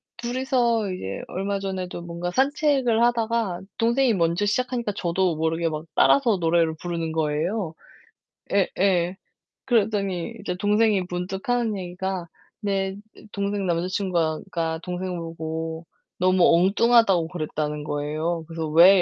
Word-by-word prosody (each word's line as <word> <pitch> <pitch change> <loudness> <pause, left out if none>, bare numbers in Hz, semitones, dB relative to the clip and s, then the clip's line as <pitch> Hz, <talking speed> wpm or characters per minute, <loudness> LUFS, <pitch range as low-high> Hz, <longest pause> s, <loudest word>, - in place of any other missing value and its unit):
둘이서 240 -3 0
이제 95 - -5
얼마 195 +2 -2
전에도 185 -3 -4
뭔가 170 +1 -4
산책을 265 - +2
하다가 230 -6 +1 0.2
동생이 235 +1 +3
먼저 170 +2 +1
시작하니까 240 0 -1
저도 175 -2 0
모르게 165 +1 0
막 155 0 -3
따라서 240 -8 +4
노래를 165 -1 +2
부르는 170 -2 -3
거예요. 160 +4 -1 0.8
예예. 185 -2 +2 0.5
그러더니 205 -4 0
이제 180 - -2
동생이 205 0 +2
문득하는 195 +6 -1
얘기가 180 0 -4 0.3
내 195 -1 -1 0.2
으 220 - -15
동생 200 -1 -1
남자친구가 175 -2 0
가 160 -1 -1
동생 180 0 -3
보고 160 0 -5 0.4
너무 185 -1 +4
엉뚱하다고 195 -1 +4
그랬다는 150 -3 -3
거예요. 155 +3 -2
그래서 165 -1 -4
"왜?" 175 +5 +7
185 Hz, 305 characters per minute, -24 LUFS, 165-210 Hz, 0.8 s, 왜